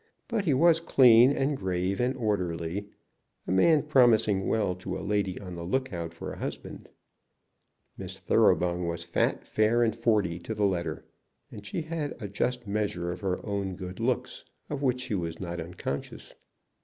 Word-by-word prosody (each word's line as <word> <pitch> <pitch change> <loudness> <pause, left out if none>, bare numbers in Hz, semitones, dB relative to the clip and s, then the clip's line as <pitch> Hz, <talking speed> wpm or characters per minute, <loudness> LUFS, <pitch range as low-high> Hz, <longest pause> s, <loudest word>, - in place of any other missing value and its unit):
But 225 -4 -1
he 155 - +3
was 165 +3 +5
clean, 125 -5 +6
and 140 +1 0
grave, 95 -3 -2
and 130 +2 0
orderly, 90 -4 -2 0.6
a - - -3
man 145 - +4
promising 115 -9 +3
well 105 -5 +1
to 90 - -5
a 95 - -6
lady 100 -2 -1
on 90 -3 -8
the 85 - -6
lookout 85 -4 -2
for 85 - -7
a - - -10
husband. - - -6 1.1
Miss - - -7
Thoroughbung 90 0 +2
was 85 0 -3
fat, - - 0
fair, 110 +2 +2
and 110 -2 +1
forty 105 -7 +1
to 100 +6 -5
the 105 -1 +1
letter, 90 -3 -2 0.5
and 105 - -9
she 165 - -3
had 155 -2 -4
a 105 - -5
just 120 +4 -2
measure 100 -4 -2
of 90 - -7
her 95 -2 -2
own 100 -2 -2
good 90 -1 -8
looks, - - -1 0.3
of 145 -2 -3
which 125 -2 +1
she 130 -3 -4
was 85 -4 -3
not 85 -2 -5
unconscious. 80 -4 -6
100 Hz, 170 wpm, -28 LUFS, 90-125 Hz, 1.1 s, clean